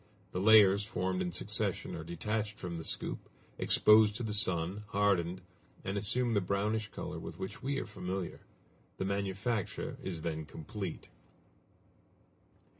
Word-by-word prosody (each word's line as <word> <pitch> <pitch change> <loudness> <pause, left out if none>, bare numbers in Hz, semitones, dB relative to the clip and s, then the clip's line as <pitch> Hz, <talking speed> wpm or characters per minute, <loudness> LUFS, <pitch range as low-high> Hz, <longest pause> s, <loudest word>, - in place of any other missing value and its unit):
The 90 - -2
layers 100 -1 +7
formed 95 -2 -1
in 90 -1 -1
succession - - -1
are 80 - -5
detached 105 +6 -2
from 85 -2 -4
the - - -6
scoop, - - -3 0.3
exposed 105 -1 +6
to 120 - -3
the 110 -2 -2
sun, 95 -1 +1
hardened, 95 -3 +1 0.4
and 95 - -2
assume 115 +4 +1
the 100 - +3
brownish 105 +3 0
color - - -6
with - - -7
which 95 - -6
we 140 +1 -1
are - - -2
familiar. 90 0 -4 0.6
The 95 - -1
manufacture 100 +2 -2
is 85 -4 -4
then 80 -2 -2
complete. 90 +3 -6
100 Hz, 140 wpm, -33 LUFS, 90-105 Hz, 0.6 s, layers